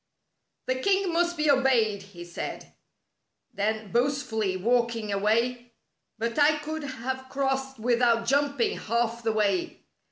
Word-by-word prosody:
" - - -53
The 255 0 -1
king 385 +3 +1
must 345 0 +1
be 300 -1 +3
obeyed," 240 -7 +2
he 190 -3 -11
said. 175 - -7 0.8
Then 215 0 -2
boastfully, 235 -6 0
walking 230 0 0
away: 235 +4 0 0.4
"But 230 +4 -2
I 300 +1 +5
could 310 +1 -5
have 260 -1 -5
crossed 270 0 -1
without 235 0 +2
jumping 280 -1 +1
half 235 +1 -1
the 225 -1 0
way. 205 -4 0
240 Hz, 130 wpm, -27 LUFS, 220-270 Hz, 0.8 s, I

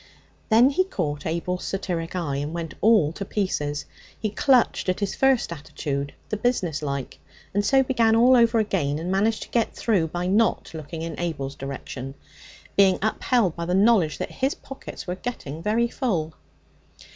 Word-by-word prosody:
Then 240 +5 +6
he 370 +7 +3
caught 155 - -3
Abel's 170 +3 -2
satiric 180 -3 -3
eye, 155 -6 -1
and 145 +3 -3
went 165 -2 -4
all 210 -9 +4
to 200 - -5
pieces. 150 -8 -2 0.3
He 215 -2 -2
clutched 250 -4 +3
at 185 - 0
his 200 -2 -1
first 265 -9 +2
attitude 145 -2 -4 0.2
the 215 - -1
business 195 - 0
like 140 -3 -4 0.3
and 205 +1 +1
so 270 +5 +4
began 235 -4 +3
all 245 +3 +6
over 235 -1 +4
again, 185 -10 0
and 170 +3 -3
managed 210 +3 +1
to - - -14
get 235 -2 0
through 195 -8 +1
by 175 +2 -3
not 210 +2 +1
looking 160 +1 -6
in 165 - -5
Abel's 145 -6 -3
direction, 135 -1 -7 0.6
being 195 -2 +5
upheld 220 -3 +1
by 170 - -4
the 180 +1 0
knowledge 195 -6 +4
that - - -4
his 265 +2 -1
pockets 270 - -9
were 180 - -2
getting 180 - -6
very 220 +5 +2
full. 180 - -2
185 Hz, 170 wpm, -24 LUFS, 155-225 Hz, 0.6 s, Then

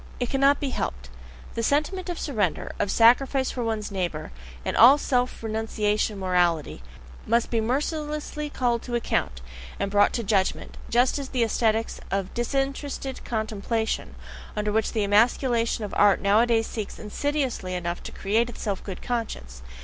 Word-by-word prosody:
It 245 -1 -2
cannot 275 +1 +4
be 275 -2 -2
helped: 65 - -4 0.4
the 230 - -2
sentiment 305 - 0
of 350 - -3
surrender, 210 - -1
of 205 - 0
sacrifice 260 +5 +4
for 245 - -3
one's 220 -2 -2
neighbour, 175 -5 -3 0.3
and - - -1
all 260 +5 +8
self 250 -4 -1
renunciation 215 -1 -1
morality, 175 - +1 0.5
must 235 0 +2
be 230 -2 +2
mercilessly 300 +4 -2
called 240 -4 0
to 240 - -4
account, 65 - -1 0.4
and 200 - -1
brought 205 0 +4
to 235 - -1
judgment; 195 -2 0
just 245 +4 +3
as 275 -1 -5
the 250 -3 +1
aesthetics 225 0 0
of 195 -1 -2
"disinterested 270 +2 -2
contemplation," 220 0 -2 0.4
under 210 0 -1
which 220 +1 +1
the 215 - +1
emasculation 230 +2 +2
of 205 - -5
art 205 -1 +5
nowadays 225 +3 +3
seeks 215 -3 -5
insidiously 250 -4 -2
enough 175 -1 -3
to - - -8
create 225 +5 0
itself 205 -4 -4
a - - -17
good 190 -3 -7
conscience. 65 - -4
225 Hz, 155 wpm, -25 LUFS, 205-255 Hz, 0.5 s, all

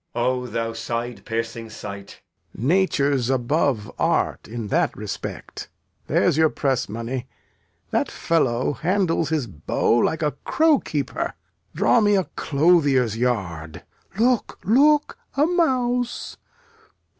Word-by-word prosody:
Edg. - - -1
O 125 +1 0
thou 115 -1 -2
side 115 -1 -4
piercing 115 0 -4
sight! 100 -2 -9 0.3
Lear. 120 - -3
Nature 150 -5 +2
's 120 0 -2
above 130 -3 0
art - - 0
in 110 -1 -5
that - - +1
respect. - - -6 0.4
There's - - +2
your 160 -1 +5
press 135 -7 -1
money. 115 +4 -4 0.6
That - - +1
fellow 130 -6 0
handles 165 0 0
his 155 -5 0
bow 80 -2 -1
like 160 +7 +1
a 150 - +2
crow 315 -3 +3
keeper. 325 - -3 0.4
Draw 235 - +4
me 205 -1 +4
a 190 - +2
clothier's 140 -7 +3
yard. 95 -10 -2 0.3
Look, 240 +1 +1
look, 290 +7 +3 0.2
a 290 - +5
mouse! 250 -8 0
135 Hz, 125 wpm, -23 LUFS, 115-190 Hz, 0.6 s, your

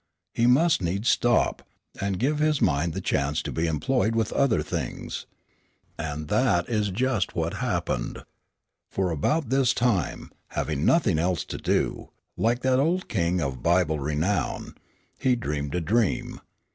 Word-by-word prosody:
He 115 - +2
must 150 - +4
needs 95 +6 0
stop, 120 -1 +2 0.4
and 100 -1 -1
give 145 +8 0
his 155 -1 +2
mind 80 0 +1
the - - -3
chance 70 +2 0
to - - -4
be 80 +1 -1
employed 110 - +1
with 115 -2 0
other 115 - +2
things. - - -5 0.7
And 75 -2 -4
that 100 - +2
is 105 -3 0
just 120 +2 0
what - - -1
happened. - - -2 0.7
For 95 -2 -1
about 130 - 0
this 130 -2 +3
time, 115 - 0 0.2
having 75 -1 -2
nothing 110 - +3
else 90 +1 0
to - - -6
do, - - -1 0.3
like 120 +2 +1
that 130 0 +2
old 170 +6 0
king 85 0 0
of 65 -4 -3
Bible 85 -3 +2
renown, 75 +3 -1 0.5
he 130 -1 +3
dreamed 75 - -3
a 90 - 0
dream. 110 +5 0
95 Hz, 150 wpm, -26 LUFS, 80-125 Hz, 0.7 s, must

